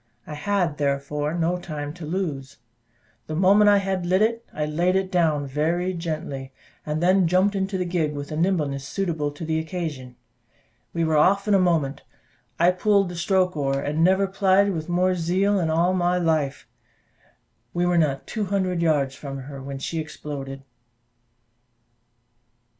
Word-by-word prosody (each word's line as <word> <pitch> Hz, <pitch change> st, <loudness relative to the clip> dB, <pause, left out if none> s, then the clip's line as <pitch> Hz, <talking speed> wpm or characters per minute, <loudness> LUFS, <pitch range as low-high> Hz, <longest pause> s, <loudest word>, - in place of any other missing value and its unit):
I 155 Hz, -, -8 dB
had 170 Hz, 0 st, -1 dB
therefore 145 Hz, +2 st, -1 dB
no 175 Hz, +1 st, 0 dB
time 150 Hz, -4 st, -5 dB
to 170 Hz, -3 st, -8 dB
lose. 155 Hz, -7 st, -3 dB, 0.7 s
The 155 Hz, -, -4 dB
moment 200 Hz, +4 st, +5 dB
I 205 Hz, -, +6 dB
had 190 Hz, -2 st, -1 dB
lit 185 Hz, +4 st, +2 dB
it, 230 Hz, +1 st, 0 dB
I 150 Hz, -, -2 dB
laid 170 Hz, +5 st, +1 dB
it 190 Hz, -1 st, 0 dB
down 155 Hz, -5 st, +2 dB
very 165 Hz, +7 st, -1 dB
gently, 155 Hz, -5 st, -5 dB, 0.4 s
and 155 Hz, +2 st, -1 dB
then 185 Hz, 0 st, +4 dB
jumped 185 Hz, +4 st, +3 dB
into 195 Hz, 0 st, -1 dB
the 180 Hz, -, -1 dB
gig, 170 Hz, -4 st, -1 dB
with 145 Hz, +1 st, -6 dB
a -, -, -3 dB
nimbleness 155 Hz, -5 st, 0 dB
suitable 165 Hz, -6 st, -2 dB
to 145 Hz, +3 st, -8 dB
the 160 Hz, 0 st, 0 dB
occasion. 160 Hz, -7 st, -5 dB, 0.8 s
We 170 Hz, -, -1 dB
were 160 Hz, -1 st, +2 dB
off 195 Hz, +6 st, +3 dB
in 210 Hz, -, +3 dB
a 195 Hz, -, +5 dB
moment: 165 Hz, -7 st, +1 dB, 0.6 s
I 175 Hz, +2 st, +5 dB
pulled 195 Hz, +1 st, +2 dB
the 175 Hz, -, -7 dB
stroke 180 Hz, +1 st, +1 dB
oar, 135 Hz, -2 st, 0 dB
and 145 Hz, +2 st, -2 dB
I -, -, +3 dB
never 190 Hz, +3 st, +4 dB
plied 195 Hz, 0 st, +2 dB
with 160 Hz, 0 st, -5 dB
more 180 Hz, +1 st, +2 dB
zeal 185 Hz, +4 st, +1 dB
in 165 Hz, -3 st, 0 dB
all 170 Hz, +3 st, +2 dB
my 180 Hz, -1 st, +1 dB
life: 155 Hz, -5 st, 0 dB, 1.0 s
we 175 Hz, 0 st, 0 dB
were 175 Hz, -1 st, +3 dB
not 140 Hz, -4 st, 0 dB
two 215 Hz, -3 st, -3 dB
hundred 185 Hz, -3 st, -1 dB
yards 145 Hz, -5 st, +2 dB
from 135 Hz, -1 st, -7 dB
her 135 Hz, +1 st, -9 dB
when 135 Hz, 0 st, -6 dB
she 160 Hz, +4 st, -3 dB
exploded. 140 Hz, -3 st, -6 dB
170 Hz, 170 wpm, -24 LUFS, 150-185 Hz, 1.0 s, I